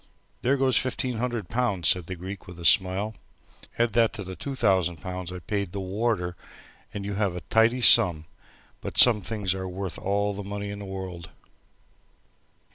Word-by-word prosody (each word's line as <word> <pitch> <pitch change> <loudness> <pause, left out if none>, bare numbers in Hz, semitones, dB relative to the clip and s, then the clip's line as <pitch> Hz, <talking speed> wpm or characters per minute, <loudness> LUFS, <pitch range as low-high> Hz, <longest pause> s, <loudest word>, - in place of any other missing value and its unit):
"There 135 +3 +1
goes 130 -1 +2
fifteen 130 -1 -2
hundred 120 -5 -3
pounds," 115 -7 -1
said 90 -3 +2
the 95 - -5
Greek, 95 +3 -9
with 90 -1 -11
a 85 - -8
smile, 95 +4 +3 0.6
"add 120 0 +1
that 115 -2 +3
to 100 - -5
the 95 0 -8
two 140 +6 -6
thousand 95 - +1
I 90 0 -6
paid 100 -4 -3
the 100 - -4
warder 95 -2 -2 0.6
and 100 -1 -6
you 100 - -4
have 100 -3 -1
a 90 - -6
tidy 115 +9 +2
sum 90 -10 +7 0.6
but - - -7
some 115 -4 +7
things 100 -1 -2
are 95 -1 -5
worth 95 -1 -6
all 100 +1 -1
the 100 - -6
money 100 +1 -5
in 100 - -7
the 100 - -8
world!" 95 -3 -7
100 Hz, 180 wpm, -25 LUFS, 90-115 Hz, 0.6 s, sum